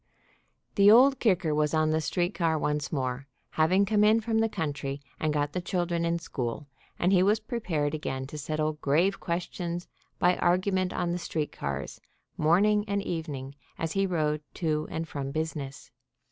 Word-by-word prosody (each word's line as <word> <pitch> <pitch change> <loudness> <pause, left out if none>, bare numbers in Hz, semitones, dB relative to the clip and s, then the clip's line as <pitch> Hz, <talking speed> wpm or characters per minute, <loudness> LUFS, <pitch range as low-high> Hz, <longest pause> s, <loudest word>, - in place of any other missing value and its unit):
The 200 0 +6
Old 260 +5 +7
Kicker 180 -8 +2
was 150 +1 +1
on 155 0 +2
the 160 0 +1
street 175 +4 -1
car 165 -3 +1
once 150 -1 -1
more, 130 -2 -2 0.2
having 185 +6 +3
come 210 +1 +3
in 215 +2 +5
from 225 0 0
the 225 0 +2
country 145 -6 -3 0.2
and 155 - 0
got 145 -1 -1
the 180 - -2
children 175 -2 -1
in 170 0 +1
school, 130 -4 -4 0.3
and 180 +3 +2
he 180 - +5
was 205 +3 +3
prepared 170 -10 -2
again 130 -4 -3
to 150 +3 -8
settle 155 +1 -1
grave 170 +8 +2
questions 175 0 -3 0.3
by 180 0 +3
argument 185 +1 +1
on 175 -1 -1
the 175 - -2
street 155 -3 -3
cars, 70 0 -5 0.3
morning 205 +7 +3
and 200 -1 -1
evening, 145 -7 -4 0.2
as 165 -1 -2
he 195 +1 +1
rode 155 -4 0
to 155 -3 -1
and 165 0 -4
from 140 -3 -4
business. 150 -2 -4
165 Hz, 175 wpm, -28 LUFS, 150-185 Hz, 0.3 s, Old